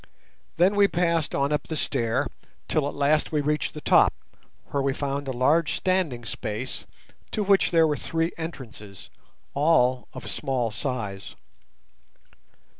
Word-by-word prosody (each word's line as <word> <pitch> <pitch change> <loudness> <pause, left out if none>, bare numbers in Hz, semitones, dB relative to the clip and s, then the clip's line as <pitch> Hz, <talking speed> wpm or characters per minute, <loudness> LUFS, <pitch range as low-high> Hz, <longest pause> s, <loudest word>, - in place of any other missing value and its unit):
Then 185 +4 +4
we 200 -1 +6
passed 170 -4 0
on 140 +2 +1
up 150 - -1
the 160 - -3
stair 130 -2 0 0.4
till 155 -3 +1
at - - -5
last 145 +2 +2
we 155 - +1
reached 150 +2 -1
the 150 - -6
top, - - +5 0.6
where 140 - 0
we 135 0 +1
found 140 0 -3
a - - -1
large 145 +6 +2
standing 175 -11 0
space 110 +3 -4 0.4
to 215 - -1
which 195 -1 +4
there 165 -2 +5
were 150 -1 +1
three 165 +1 -1
entrances, 115 - -8 0.4
all 130 -5 +3
of - - -8
small 130 -5 -1
size. 105 -5 -4
145 Hz, 145 wpm, -25 LUFS, 125-165 Hz, 0.6 s, we